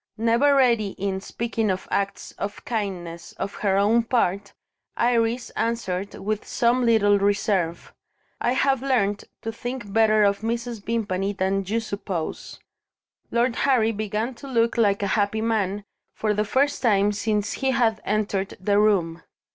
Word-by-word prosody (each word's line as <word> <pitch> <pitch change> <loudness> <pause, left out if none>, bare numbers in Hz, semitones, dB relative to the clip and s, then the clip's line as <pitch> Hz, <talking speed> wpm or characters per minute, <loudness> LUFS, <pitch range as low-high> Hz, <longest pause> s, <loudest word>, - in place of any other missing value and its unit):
Never 235 +6 +3
ready 235 -7 +3
in 190 -1 -2
speaking 225 +1 -2
of 185 0 -2
acts 200 0 -2
of 205 0 -5
kindness, 180 -7 -4
on - - -2
her 195 -2 +2
own 215 +4 +4
part, 205 -4 0 0.5
Iris 235 0 +1
answered 200 -4 -2
with 215 +1 -3
some 245 +2 +1
little 205 -3 +4
reserve: 195 -4 0 0.5
"I 245 - +1
have 270 -1 +2
learnt 215 -7 0 0.2
to 225 - -3
think 240 -2 -6
better 215 -1 +4
of 200 0 +2
Mrs. 235 -1 -3
Vimpany 205 -4 -1
than 195 0 0
you 220 +3 0
suppose." 200 -6 -5 0.7
Lord 235 0 +1
Harry 240 -5 +3
began 215 +3 -2
to 260 +4 -11
look 230 -3 +1
like 205 -3 +2
a 200 - 0
happy 210 +1 +1
man, 205 -3 -1 0.3
for 215 -1 0
the 210 +1 0
first 275 +7 +1
time 205 -4 +3
since 210 0 -1
he 270 - -1
had 230 -4 +1
entered 200 -1 -1
the 200 +2 +2
room. 180 -6 +2
215 Hz, 150 wpm, -24 LUFS, 200-235 Hz, 0.7 s, own